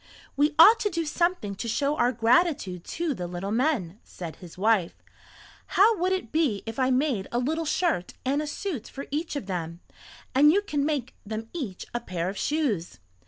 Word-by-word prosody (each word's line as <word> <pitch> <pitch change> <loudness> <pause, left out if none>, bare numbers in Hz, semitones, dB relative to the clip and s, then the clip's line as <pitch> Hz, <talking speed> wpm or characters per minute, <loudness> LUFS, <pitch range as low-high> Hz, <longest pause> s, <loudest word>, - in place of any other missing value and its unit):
"We 295 +2 +2
ought 435 +8 +9
to 420 - 0
do 335 -3 -2
something 340 - 0
to 215 +4 -5
show 280 +6 0
our 245 -4 +2
gratitude 230 - +2
to 335 -3 -2
the 180 -7 -5
little 180 +3 -4
men," 225 - 0
said 170 -3 -8
his 180 -1 -12
wife. 200 -3 +2 0.8
"How 440 +4 +6
would 365 +2 +1
it 370 -12 -2
be 290 -11 +1
if 225 +3 -5
I 260 0 +3
made 255 -6 +1
a 240 - -1
little 315 +7 -1
shirt 310 - 0
and 280 +3 +1
a 305 - -4
suit 295 - -4
for 275 - -7
each 310 +2 -2
of 285 - -3
them, 170 -3 -4 0.5
and 290 +3 +6
you 400 +4 +2
can 290 -8 -1
make 280 -5 -2
them 220 +2 -5
each 250 - -5
a 240 - 0
pair 180 -6 -3
of 195 - -6
shoes." 250 - -1
260 Hz, 195 wpm, -26 LUFS, 200-315 Hz, 0.8 s, ought